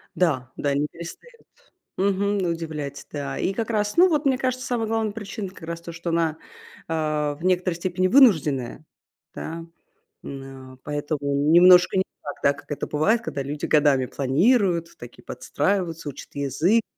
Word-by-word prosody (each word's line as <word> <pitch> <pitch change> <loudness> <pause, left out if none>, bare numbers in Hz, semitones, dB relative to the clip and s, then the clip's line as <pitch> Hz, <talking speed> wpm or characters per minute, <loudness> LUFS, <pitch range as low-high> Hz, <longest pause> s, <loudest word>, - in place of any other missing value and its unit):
да, 130 -8 0
да, 140 -1 0
не 145 +1 0
перестают 315 - -11 0.6
мгм, 200 +1 +1
удивлять, 155 -4 -5
да. 140 -2 -4
И 195 - 0
как 225 +3 -3
раз, 210 +1 0
ну, 365 +2 +7
вот 305 -3 +1
мне 265 - +4
кажется, 255 0 -2
самая 230 -3 -1
главная 220 -2 0
причина 205 -1 -6
как 185 -2 -15
раз 170 0 -4
то, 170 0 -8
что 170 0 -5
она, 165 -1 0 0.5
а, 155 -2 -1
в 165 - -11
некоторой 180 -1 +1
степени 185 +1 0
вынужденная, 155 - +3 0.5
да, 165 +1 -6 0.6
м, 135 -1 -9
а - - -20
поэтому 145 0 -3 0.3
немножко 180 +1 +7
не 190 - +4 0.2
так, 145 - -5
да, 140 - +4
как 145 0 -15
это - - -3
бывает, 215 +11 +2
когда 140 -11 -4
люди 145 +2 -4
годами 145 -4 +3
планируют, 170 - +2
такие, 120 0 -12
подстраиваются, 165 +3 -2
учат 140 - -10
язык. 160 - +1
170 Hz, 165 wpm, -24 LUFS, 145-200 Hz, 0.6 s, ну